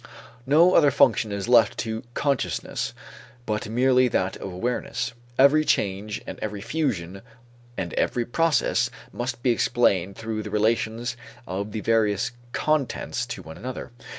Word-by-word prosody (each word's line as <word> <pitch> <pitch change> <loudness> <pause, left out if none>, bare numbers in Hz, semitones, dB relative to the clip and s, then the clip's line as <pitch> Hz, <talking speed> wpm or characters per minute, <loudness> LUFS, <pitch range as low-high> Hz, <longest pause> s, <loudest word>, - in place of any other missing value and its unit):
No 165 +6 +6
other 150 -3 +6
function 125 -5 +3
is 100 +1 -3
left 120 -2 +5
to 110 0 -3
consciousness 140 -3 -1 0.5
but 105 -2 -2
merely 125 +2 +4
that 95 -5 0
of 95 - -6
awareness. 115 +5 -2 0.2
Every 140 +3 +6
change 100 -5 -1
and - - -7
every 105 -1 -4
fusion 100 - -2 0.6
and 90 -3 -3
every 120 -1 0
process 165 +5 +2 0.2
must 120 -1 -4
be 125 - +4
explained 100 -6 +2
through 110 -1 -4
the 105 - -6
relations 115 +3 0 0.3
of 100 +3 -4
the 110 - -4
various 110 -3 +1 0.2
contents 135 -5 -1
to 120 - -6
one 80 0 -10
another. 130 0 -6
115 Hz, 140 wpm, -25 LUFS, 105-130 Hz, 0.6 s, No